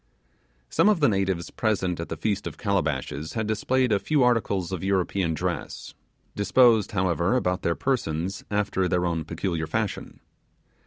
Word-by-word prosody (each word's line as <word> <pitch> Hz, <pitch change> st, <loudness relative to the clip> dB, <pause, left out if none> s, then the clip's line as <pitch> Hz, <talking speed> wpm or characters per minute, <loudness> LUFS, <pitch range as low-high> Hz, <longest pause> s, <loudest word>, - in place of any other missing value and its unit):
Some -, -, +4 dB
of 205 Hz, -5 st, +3 dB
the 145 Hz, -, +4 dB
natives 95 Hz, -5 st, 0 dB
present 95 Hz, -6 st, -1 dB
at 85 Hz, -, -5 dB
the 80 Hz, -, -4 dB
Feast 100 Hz, +2 st, -1 dB
of -, -, -7 dB
Calabashes 80 Hz, -, -2 dB
had 110 Hz, -1 st, -1 dB
displayed 125 Hz, +4 st, +1 dB
a 100 Hz, -, +3 dB
few 150 Hz, +2 st, +2 dB
articles 105 Hz, -7 st, +1 dB
of 95 Hz, -2 st, -4 dB
European 95 Hz, -3 st, 0 dB
dress; -, -, -4 dB, 0.4 s
disposed 110 Hz, +1 st, +4 dB
however, 90 Hz, +2 st, +1 dB
about 90 Hz, -7 st, 0 dB
their 85 Hz, -, 0 dB
persons 95 Hz, -, -2 dB
after 105 Hz, -2 st, 0 dB
their 90 Hz, 0 st, +1 dB
own 85 Hz, -2 st, -1 dB
peculiar 80 Hz, -1 st, -3 dB
fashion. 110 Hz, +4 st, -3 dB
95 Hz, 155 wpm, -25 LUFS, 85-110 Hz, 0.4 s, Some